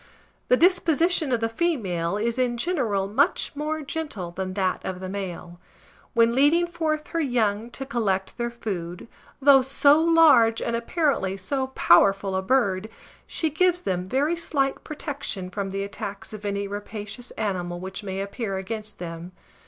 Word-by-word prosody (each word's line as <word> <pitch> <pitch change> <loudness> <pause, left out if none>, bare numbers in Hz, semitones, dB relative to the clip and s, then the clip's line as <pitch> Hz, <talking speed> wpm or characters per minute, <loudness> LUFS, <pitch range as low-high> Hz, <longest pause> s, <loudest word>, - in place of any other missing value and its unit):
The 250 - +4
disposition 340 -3 +3
of 235 -2 +1
the 225 - +2
female 210 - -1
is 230 +3 -1
in 245 -2 +1
general 235 - 0
much 275 - +1
more 305 +1 -3
gentle 275 - -5
than 185 +1 -5
that 190 -2 0
of 185 -1 -4
the 185 - -5
male. 180 -3 -6 0.6
When 230 0 +4
leading 295 +7 +4
forth 320 -3 -2
her 335 - -2
young 230 -6 0
to 270 +3 -6
collect 205 -8 -1
their 235 0 -1
food, 185 -6 -5 0.3
though 275 -1 +7
so 280 +3 +4
large 320 -9 +5
and 235 - -1
apparently 230 - 0
so 260 +8 -2
powerful 195 +2 +4
a 190 - +1
bird, 205 -3 +1 0.4
she 320 -2 -1
gives 355 +3 +2
them 180 -1 -2
very 285 - +1
slight 280 -5 -1
protection 280 - -5
from 195 +1 -3
the 195 +1 -3
attacks 200 +1 -7
of 210 -1 -8
any 200 0 -2
rapacious 205 +3 -7
animal 180 -5 -2
which 190 +3 -6
may 195 -1 -4
appear 200 0 -4
against 215 +2 -5
them. 170 +1 -7
225 Hz, 160 wpm, -25 LUFS, 195-285 Hz, 0.6 s, though